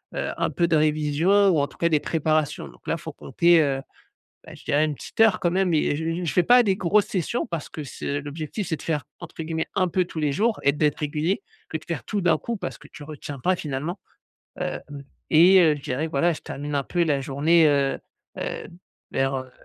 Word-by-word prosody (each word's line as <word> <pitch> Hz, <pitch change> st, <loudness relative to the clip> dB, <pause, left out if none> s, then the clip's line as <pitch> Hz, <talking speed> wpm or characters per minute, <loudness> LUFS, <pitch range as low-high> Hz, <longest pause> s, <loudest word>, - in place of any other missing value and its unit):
heu, -, -, -2 dB
un -, -, 0 dB
peu 170 Hz, -, +1 dB
de 165 Hz, -, +3 dB
révision 155 Hz, +6 st, +3 dB
ou 160 Hz, -5 st, +3 dB
en 140 Hz, -, +1 dB
tout -, -, -19 dB
cas 170 Hz, -, +2 dB
des 155 Hz, -2 st, +3 dB
préparations. 155 Hz, -2 st, -1 dB
Donc -, -, -20 dB
là, -, -, +1 dB
il -, -, -14 dB
faut -, -, -7 dB
compter, 170 Hz, -1 st, +3 dB
heu, 135 Hz, -2 st, 0 dB, 0.6 s
bah, -, -, -11 dB
je -, -, -15 dB
dirais 145 Hz, +2 st, +2 dB
1 150 Hz, -, -2 dB
petite -, -, -8 dB
heure 225 Hz, -2 st, +6 dB
quand 175 Hz, -, +1 dB
même 185 Hz, -3 st, +2 dB
et 150 Hz, -, +2 dB
heu, -, -, -1 dB
j 160 Hz, +1 st, -2 dB
j 180 Hz, -, -3 dB
je 155 Hz, -, -1 dB
fais 180 Hz, -, +4 dB
pas 245 Hz, 0 st, +7 dB
des 195 Hz, -3 st, +2 dB
grosses 200 Hz, +3 st, +2 dB
sessions 195 Hz, +6 st, -2 dB
parce 165 Hz, -4 st, -5 dB
que 155 Hz, -, -7 dB
c'est 140 Hz, +2 st, -4 dB
l'objectif, 155 Hz, +7 st, -5 dB
c'est 160 Hz, -, -1 dB
de -, -, -12 dB
faire 150 Hz, -5 st, -2 dB, 0.2 s
entre -, -, -8 dB
guillemets, 160 Hz, 0 st, -2 dB
«un 185 Hz, -, +2 dB
peu 180 Hz, +2 st, +1 dB
tous 160 Hz, -, -8 dB
les 150 Hz, -2 st, +1 dB
jours» 215 Hz, +8 st, +1 dB
et 140 Hz, -, +5 dB
d'être 150 Hz, 0 st, 0 dB
régulier, 155 Hz, +6 st, -1 dB, 0.3 s
que -, -, -2 dB
de -, -, -17 dB
faire 170 Hz, -4 st, -4 dB
tout 205 Hz, -, -2 dB
d'un 170 Hz, -3 st, +3 dB
coup, 235 Hz, +9 st, -4 dB
parce -, -, -6 dB
que 150 Hz, -, -15 dB
tu 150 Hz, -, -12 dB
retiens 145 Hz, -1 st, -8 dB
pas 185 Hz, +6 st, +2 dB
finalement. 155 Hz, +6 st, -4 dB, 0.6 s
Heu, -, -, -2 dB, 0.5 s
et 180 Hz, +4 st, +7 dB
heu, 160 Hz, -4 st, +5 dB
je 140 Hz, -, -11 dB
dirais 140 Hz, +4 st, -2 dB
voilà, 160 Hz, +4 st, +2 dB
je -, -, -10 dB
termine 145 Hz, +1 st, -5 dB
un 140 Hz, -, +1 dB
peu 175 Hz, -1 st, 0 dB
la 145 Hz, -4 st, +1 dB
journée 155 Hz, +5 st, +3 dB
heu 140 Hz, -1 st, +1 dB, 0.4 s
heu, -, -, -4 dB, 0.4 s
vers 135 Hz, 0 st, 0 dB
heu 130 Hz, -1 st, -6 dB
155 Hz, 245 wpm, -24 LUFS, 145-175 Hz, 0.6 s, pas